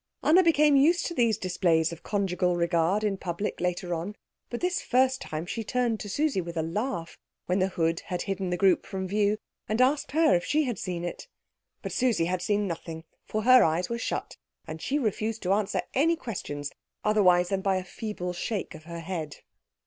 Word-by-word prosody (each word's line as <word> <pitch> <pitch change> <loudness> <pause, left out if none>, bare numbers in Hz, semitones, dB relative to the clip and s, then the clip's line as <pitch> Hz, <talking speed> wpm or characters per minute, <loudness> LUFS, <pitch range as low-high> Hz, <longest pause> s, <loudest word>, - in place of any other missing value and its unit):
Anna 345 +5 +6
became 300 -4 +4
used 320 +6 +4
to 345 - -3
these 230 - +2
displays 170 -4 +1
of 170 - -8
conjugal 180 -3 0
regard 170 +4 +1
in 205 -2 0
public 180 +2 -4
later 180 0 -1
on; 175 +5 -4 0.3
but 240 - -4
this 360 +1 0
first 260 +1 +2
time 155 +1 -4
she 225 +5 -4
turned 235 0 0
to 205 - -6
Susie 285 -2 +1
with 170 -1 -7
a 160 - +1
laugh, 175 0 -3 0.3
when 180 +2 +1
the 185 - +3
hood 165 -2 0
had 180 -3 -2
hidden 195 -2 -2
the 180 - -1
group 190 -1 +3
from 190 -1 -4
view, 205 +2 +1 0.3
and 215 +2 0
asked 270 +2 +2
her 320 - +4
if 175 - +1
she 305 +1 +2
had 245 -6 -3
seen 175 -2 -3
it. 175 - -6 0.6
But - - -4
Susie 240 -10 +2
had 180 +1 -1
seen 205 +2 +1
nothing, 165 -1 -6 0.2
for 215 0 -2
her 255 +2 +8
eyes 165 +3 +1
were 235 0 -2
shut, - - -3 0.3
and 160 -1 -7
she 280 - 0
refused 225 -3 -1
to 185 +1 +2
answer 210 0 0
any 325 +5 +3
questions 145 - -5 0.3
otherwise 180 -4 +4
than 195 -1 0
by 195 -1 +1
a 185 - -3
feeble 180 -1 -5
shake 190 +3 -3
of 155 -1 -12
the 170 0 -7
head. 165 -3 -4
195 Hz, 200 wpm, -27 LUFS, 175-235 Hz, 0.6 s, her